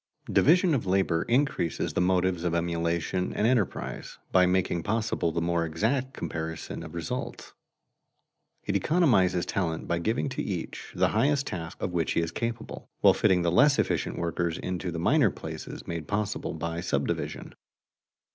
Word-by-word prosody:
Division 175 +3 +5
of 120 -8 -1
labor 90 -3 +2
increases 125 - +1
the - - +1
motives 90 -1 +1
of 85 -1 0
emulation 85 +1 -1
and 105 - 0
enterprise, 115 -5 -1
by 90 -1 +5
making 90 -2 +1
possible 105 -2 0
the 85 +1 -1
more 85 0 +1
exact 115 - -1
comparison 80 0 -5
of 80 +1 -9
results. 85 +10 -5 1.1
It - - -2
economizes 115 - +3
talent 80 -4 -2
by 85 - 0
giving 110 +11 0
to 130 - -3
each 90 -5 -5
the - - +3
highest 140 0 +2
task 80 -6 -6
of - - -2
which 85 -2 0
he - - +2
is 85 0 -1
capable, 115 +2 -5
while - - +7
fitting 90 -2 +3
the 85 - +2
less 140 - +5
efficient - - 0
workers 85 0 -1
into 90 0 -3
the 85 - -4
minor 85 - +4
places - - -7
made 85 -2 -5
possible 105 -5 -2
by 85 +1 -3
subdivision. - - -2
90 Hz, 155 wpm, -28 LUFS, 85-115 Hz, 1.1 s, while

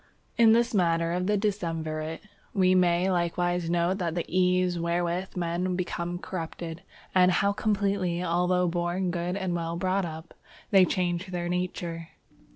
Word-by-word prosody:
_ - - -33 0.3
In 225 -1 +6
this 235 +1 +2
matter 170 -3 +2
of 180 +1 -1
the 210 0 +2
decemvirate 165 -6 -2 0.3
we 185 -2 +4
may 180 0 +3
likewise 175 0 0
note 175 +3 +1
the 170 -1 -2
ease 180 -1 +2
wherewith 175 +2 -1
men 175 +1 -1
become 175 -1 -3
corrupted, 170 -1 -6 0.3
and 180 -1 +5
how 200 +2 +2
completely, 200 -4 0
although 180 +1 +2
born 175 +2 -1
good 175 +2 -2
and 190 -3 -2
well 165 -1 -2
brought 185 +1 0
up, 160 +1 -9 0.4
they 190 -2 +7
change 180 0 -1
their 175 -1 -3
nature. 175 -2 -3
180 Hz, 150 wpm, -27 LUFS, 170-185 Hz, 0.4 s, they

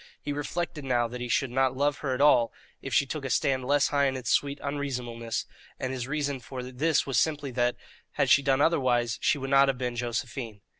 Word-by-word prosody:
He 145 - -4
reflected 150 +1 -3
now 120 -3 +1
that 125 +1 -7
he 125 - -3
should 135 0 +1
not 130 0 +1
love 145 0 +1
her 135 -3 -1
at 125 - -2
all 125 -5 +5 0.3
if 135 - -6
she 125 +4 +3
took 145 +1 -5
a 135 - -3
stand 130 0 +1
less 145 +1 +3
high 140 -1 +2
in 135 -1 -1
its 125 -4 -3
sweet 140 0 +1
unreasonableness, 125 -5 -3 0.3
and 130 0 -3
his 125 -1 -4
reason 145 -2 -2
for 125 +1 -7
this 135 +5 0
was 135 -4 +1
simply 145 -2 0
that, 120 0 +1 0.4
had - - +1
she - - +6
done 135 0 +2
otherwise, 125 -7 +2
she - - +2
would 135 0 -5
not 140 0 +6
have 135 -2 0
been 125 -1 -3
Josephine. 120 -2 -4
135 Hz, 220 wpm, -28 LUFS, 125-145 Hz, 0.4 s, she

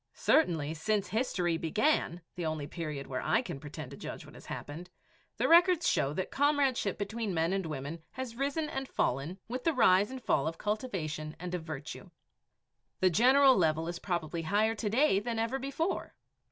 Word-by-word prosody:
Certainly, 160 - +2
since 205 +5 -1
history 180 -8 0
began, 175 - +1
the 175 - -5
only 155 -2 -2
period 150 -3 -5
where 130 -1 -4
I - - +2
can 145 - -6
pretend 150 -2 -8
to - - -9
judge - - -7
what - - -14
has - - -13
happened, 170 +5 -7 0.5
the - - +1
records 345 0 +5
show 135 - +2
that 185 - -3
comradeship 275 -8 +2
between 210 -1 -3
men 165 +3 +1
and 195 -3 -1
women 150 +2 -5
has 255 -3 -5
risen 285 +4 -1
and 270 -3 -4
fallen 140 - -1
with 250 +2 -4
the 330 - +2
rise 200 -6 +5
and 260 0 -6
fall 155 - +1
of 165 +1 -3
cultivation 175 -9 -3
and 180 +1 -5
of 180 - -2
virtue. 160 +4 -7 0.9
The 185 -1 +4
general 260 - +6
level 160 -2 +1
is 175 - -4
probably 170 -3 -2
higher 205 +7 +2
to 215 -1 -3
day 235 -2 +3
than 230 +2 -3
ever 230 +4 -1
before. 275 +7 -3
190 Hz, 180 wpm, -31 LUFS, 160-255 Hz, 0.9 s, general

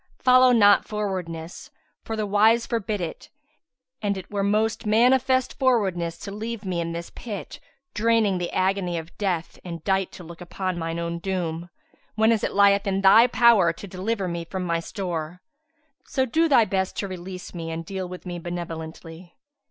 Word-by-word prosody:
[FN#154] - - -34
Follow 255 0 +6
not 205 -4 +6
frowardness, 185 -6 -5 0.3
for 225 - -5
the 215 -1 -1
wise 220 +3 +4
forbid 215 -4 -2
it: 170 - -6 0.7
and 200 -2 -1
it 190 +1 -9
were 200 -1 -1
most 215 +2 0
manifest 255 +3 +3
frowardness 190 -10 +1
to 200 - -6
leave 220 +1 -5
me 180 -2 -1
in 170 0 -3
this 170 0 -6
pit 210 -5 -7 0.3
draining 220 -4 +2
the 175 - -3
agony 185 -2 0
of 165 +1 -8
death 180 -5 -2
and 170 -3 -7
dight 190 -1 0
to 185 - -11
look 170 +1 -11
upon 185 0 -4
mine 165 0 -3
own 170 0 -3
doom, 175 -2 -3 0.5
whenas 220 0 +3
it - - -1
lieth 200 0 +4
in 195 0 0
thy 220 +5 +7
power 235 -8 +5
to 165 - -10
deliver 195 +2 -3
me 170 -1 -3
from 185 +2 -5
my 170 -1 0
stowre. 175 -2 -5 0.6
So 265 -1 0
do 320 +6 +2
thy 240 -6 +5
best 190 -2 -2
to 200 - -2
release 185 0 -8
me 165 -2 -5
and 165 0 -5
deal 190 0 -5
with 180 +1 -9
me 175 -1 -5
benevolently." 170 0 -7
190 Hz, 175 wpm, -24 LUFS, 170-215 Hz, 0.7 s, thy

